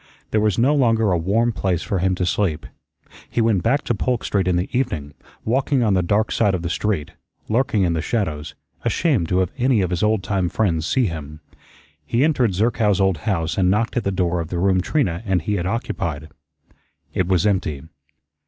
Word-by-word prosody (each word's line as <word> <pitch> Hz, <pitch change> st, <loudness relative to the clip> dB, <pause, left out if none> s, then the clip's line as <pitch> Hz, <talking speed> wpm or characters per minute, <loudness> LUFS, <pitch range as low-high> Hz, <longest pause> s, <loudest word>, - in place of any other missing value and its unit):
There 110 Hz, -, +2 dB
was 105 Hz, -3 st, +1 dB
no 130 Hz, +5 st, +3 dB
longer 115 Hz, -7 st, +2 dB
a -, -, +3 dB
warm 110 Hz, +8 st, +1 dB
place 95 Hz, -5 st, -1 dB
for 100 Hz, -, -1 dB
him 95 Hz, +1 st, +1 dB
to 90 Hz, -, -1 dB
sleep. 85 Hz, -4 st, -1 dB, 0.6 s
He -, -, -2 dB
went 110 Hz, -5 st, +2 dB
back 135 Hz, -, +1 dB
to -, -, 0 dB
Polk 120 Hz, +2 st, -1 dB
Street 95 Hz, -3 st, 0 dB
in 90 Hz, -, +2 dB
the 90 Hz, +2 st, 0 dB
evening, 85 Hz, -, -2 dB, 0.3 s
walking 130 Hz, +2 st, +1 dB
on 105 Hz, -3 st, +2 dB
the 95 Hz, -, +3 dB
dark 105 Hz, +5 st, +1 dB
side 100 Hz, -4 st, +2 dB
of 85 Hz, -, -4 dB
the 85 Hz, -, -2 dB
street, 95 Hz, -5 st, -1 dB, 0.4 s
lurking 110 Hz, -3 st, +1 dB
in 85 Hz, -2 st, +1 dB
the 80 Hz, -, -1 dB
shadows, 80 Hz, -8 st, -3 dB, 0.3 s
ashamed 125 Hz, -, +1 dB
to 90 Hz, -, +1 dB
have 90 Hz, -, -1 dB
any 125 Hz, -3 st, +3 dB
of 90 Hz, -1 st, -1 dB
his 90 Hz, -, -1 dB
old 105 Hz, -2 st, +1 dB
time 95 Hz, -3 st, 0 dB
friends 85 Hz, -6 st, 0 dB
see 130 Hz, -2 st, +2 dB
him. 75 Hz, -4 st, -6 dB, 0.6 s
He 115 Hz, -, +1 dB
entered 130 Hz, -, +2 dB
Zerkow's 105 Hz, -1 st, +2 dB
old 95 Hz, -4 st, +2 dB
house 85 Hz, -2 st, -1 dB
and 90 Hz, -1 st, +3 dB
knocked 105 Hz, +4 st, 0 dB
at 120 Hz, -, 0 dB
the -, -, 0 dB
door 90 Hz, -2 st, 0 dB
of 85 Hz, -, -3 dB
the 90 Hz, -, -4 dB
room 95 Hz, +1 st, +2 dB
Trina 90 Hz, -, 0 dB
and 95 Hz, -4 st, +1 dB
he 105 Hz, -, -1 dB
had 90 Hz, -3 st, -1 dB
occupied. 85 Hz, -, -3 dB, 0.8 s
It 95 Hz, -, 0 dB
was 95 Hz, +1 st, +2 dB
empty. 90 Hz, -9 st, 0 dB
95 Hz, 210 wpm, -21 LUFS, 85-115 Hz, 0.8 s, no